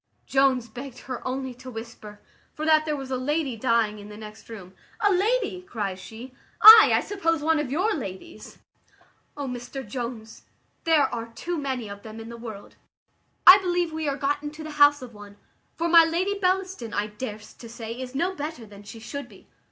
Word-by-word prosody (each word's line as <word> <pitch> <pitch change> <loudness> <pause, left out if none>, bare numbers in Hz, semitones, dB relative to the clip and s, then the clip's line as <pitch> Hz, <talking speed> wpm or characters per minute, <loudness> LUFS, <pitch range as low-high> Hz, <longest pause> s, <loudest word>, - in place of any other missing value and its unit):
Jones 265 -3 +2
begged 250 +2 -9
her 255 -1 -6
only 260 0 -4
to 255 +1 -11
whisper, 225 -3 -10 0.3
for 310 - -4
that 310 -1 +4
there 305 -1 -1
was 270 -2 -7
a 260 - 0
lady 285 0 -1
dying 225 -2 0
in 205 0 -11
the 210 - -10
next 215 +1 -12
room. 190 -5 -10 0.3
"A 410 -2 +3
lady!" 410 0 0
cries 205 - -5
she; 230 +6 -11 0.3
"ay, 440 0 +11
I - - +3
suppose 330 -6 -1
one 320 0 +2
of 295 -4 -3
your 375 +9 +1
ladies. 225 - -8 0.8
O 285 - -4
Mr 250 +1 -7
Jones, 235 -1 -6 0.4
there 320 -3 +4
are 230 -1 -4
too 335 +10 -5
many 265 -7 -3
of 200 0 -9
them 220 +1 -10
in 225 0 -9
the 235 - -8
world; 220 -4 -10 0.7
I 370 +3 +11
believe 355 -3 -1
we 315 -1 -3
are 275 - -3
got 285 +1 -1
into 300 +1 -7
the 310 - -7
house 290 -2 +4
of 240 -2 -10
one, 205 -1 -13 0.4
for 335 - -1
my 335 0 +8
Lady 345 +5 0
Bellaston 370 - -1
I 205 - 0
darst 210 0 -8
to 230 - -10
say 225 -1 -8
is 255 +1 -8
no 350 +7 0
better 300 -7 -6
than 205 -1 -14
she 205 +2 -11
should 280 +5 -7
be." - - -18
260 Hz, 200 wpm, -25 LUFS, 225-320 Hz, 0.8 s, ay